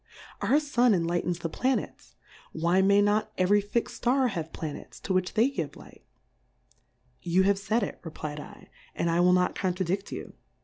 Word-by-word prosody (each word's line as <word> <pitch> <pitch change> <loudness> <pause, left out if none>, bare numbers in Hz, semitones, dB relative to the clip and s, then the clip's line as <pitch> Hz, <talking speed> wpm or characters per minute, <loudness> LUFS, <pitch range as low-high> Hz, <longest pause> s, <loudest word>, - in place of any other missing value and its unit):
Our 285 - +3
Sun 250 -7 +3
enlightens 175 0 -1
the 170 - -3
Planets; 255 +9 -2 0.4
why 170 +4 +2
may 200 +1 +5
not 215 +1 +1
every 200 +3 +4
tixM 205 +4 -1
Star 255 +2 +1
have 165 -6 -4
Pla 155 -2 -5
nets - - -11
to 190 - -2
which 185 +1 0
they 230 +3 +4
give 275 - -4
Light - - -15
r' - - -42 1.1
You 180 +2 +2
have 200 0 +2
faid 215 +3 0
it, - - -5
reflfdl^ 150 -2 -8 0.3
and 170 - 0
I 170 - +1
will 180 +1 +5
not 180 0 +2
contradi£l 185 +1 -2
you. - - -7
190 Hz, 175 wpm, -28 LUFS, 175-215 Hz, 1.1 s, may